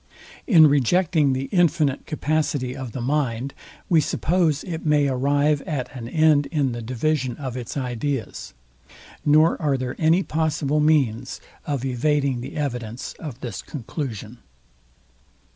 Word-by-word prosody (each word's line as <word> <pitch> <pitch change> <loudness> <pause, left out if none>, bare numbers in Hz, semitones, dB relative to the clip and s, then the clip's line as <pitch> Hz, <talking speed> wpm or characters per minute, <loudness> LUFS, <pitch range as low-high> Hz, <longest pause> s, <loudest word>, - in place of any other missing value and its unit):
In 165 -9 +7
rejecting 145 +1 +3
the 130 +1 -2
infinite 165 -6 +2
capacity 150 -4 -1
of 130 -4 -6
the 130 - -5
mind, 135 -2 -1 0.3
we 165 -3 +4
suppose 160 -1 +1
it 165 -3 -5
may 150 -2 +3
arrive 140 +3 +1
at 140 -5 -4
an 120 -2 -6
end 155 -1 +3
in 145 -5 0
the 120 0 -5
division 130 +2 -1
of 130 -4 -5
its 125 +2 -5
ideas; 125 - -4 0.7
nor 155 +4 +4
are 145 -3 +1
there 125 -1 -4
any 165 +4 +3
possible 155 -2 0
means 135 -6 +1 0.3
of 140 -3 -2
evading 135 0 0
the 130 - -8
evidence 125 -4 -4
of 140 -6 -8
this 120 - -5
conclusion. 120 -4 -6
140 Hz, 135 wpm, -23 LUFS, 125-155 Hz, 0.7 s, In